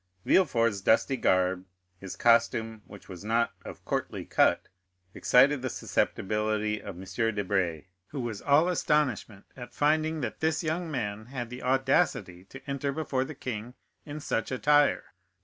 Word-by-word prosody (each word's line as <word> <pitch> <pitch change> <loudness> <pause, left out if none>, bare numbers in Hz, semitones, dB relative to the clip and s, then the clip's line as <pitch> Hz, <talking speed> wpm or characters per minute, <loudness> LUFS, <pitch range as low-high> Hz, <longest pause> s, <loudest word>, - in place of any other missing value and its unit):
Villefort's 115 - +2
dusty 110 +7 +3
garb, 95 -5 +1 0.4
his 95 -1 -7
costume, 115 -2 +2
which 100 - -13
was 95 -1 -9
not 115 +2 +1
of - - -10
courtly - - -3
cut, - - +2 0.5
excited 135 +2 +4
the 130 - -2
susceptibility 105 0 -1
of 100 - -8
M. 90 - -10 0.3
de 105 - -1
Brezé, 90 -5 -1 0.2
who 145 - -6
was 115 -5 -4
all 145 +4 +4
astonishment 140 - 0
at 125 -2 -10
finding 155 +1 +1
that 120 - -4
this 160 +1 0
young 165 +2 -2
man 110 -6 -4
had 120 -2 -6
the 125 - -7
audacity 130 - +1
to 135 +7 -13
enter 140 0 -2
before 140 -3 -1
the 155 +3 -8
king 120 -1 -6 0.3
in 150 0 -7
such 115 -5 -2
attire. 145 +3 +2
125 Hz, 150 wpm, -28 LUFS, 105-145 Hz, 0.5 s, excited